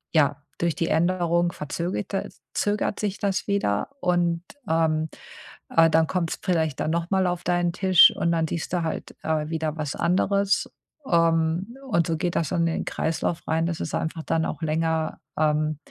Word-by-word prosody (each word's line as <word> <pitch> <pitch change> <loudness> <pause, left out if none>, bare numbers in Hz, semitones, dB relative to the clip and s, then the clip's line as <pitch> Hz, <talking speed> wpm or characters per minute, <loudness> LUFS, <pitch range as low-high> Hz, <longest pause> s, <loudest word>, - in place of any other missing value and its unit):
ja 145 -2 +3 0.2
durch 170 -1 +1
die 165 - -1
Änderung 175 0 +2
verzöget 175 +5 -4
das 190 -7 -4
zögert 205 0 0
sich 205 -2 -2
das 195 -2 -1
wieder 200 - 0
und, 175 -2 +1 0.3
ähm, 160 -1 +1 0.6
äh, 165 0 +5
dann 160 0 +3
kommt's 170 -2 -2
vielleicht 160 -6 0
dann - - 0
noch 170 +2 -2
mal 190 -1 +3
auf 175 0 -2
deinen 175 -1 +1
Tisch 185 -1 +7
und 170 - 0
dann 165 -1 +1
siehst 170 +2 -4
du 175 - +1
halt, 160 - -4
äh, 155 -1 -1
wieder 160 -1 -2
was 150 -3 -3
anderes. 200 +3 +1 0.4
Ähm, 165 +5 +2 0.2
und 170 -5 +2
so 165 -1 0
geht 175 0 -2
das 160 - 0
dann 175 -2 0
in 165 0 +1
den - - -3
Kreislauf 165 +1 -2
rein, 160 +1 +1
dass 165 -2 -3
es - - -4
einfach 160 0 -2
dann 160 0 0
auch - - -5
länger, 160 0 0 0.2
ähm, 155 -1 +1
165 Hz, 180 wpm, -25 LUFS, 160-175 Hz, 0.6 s, Tisch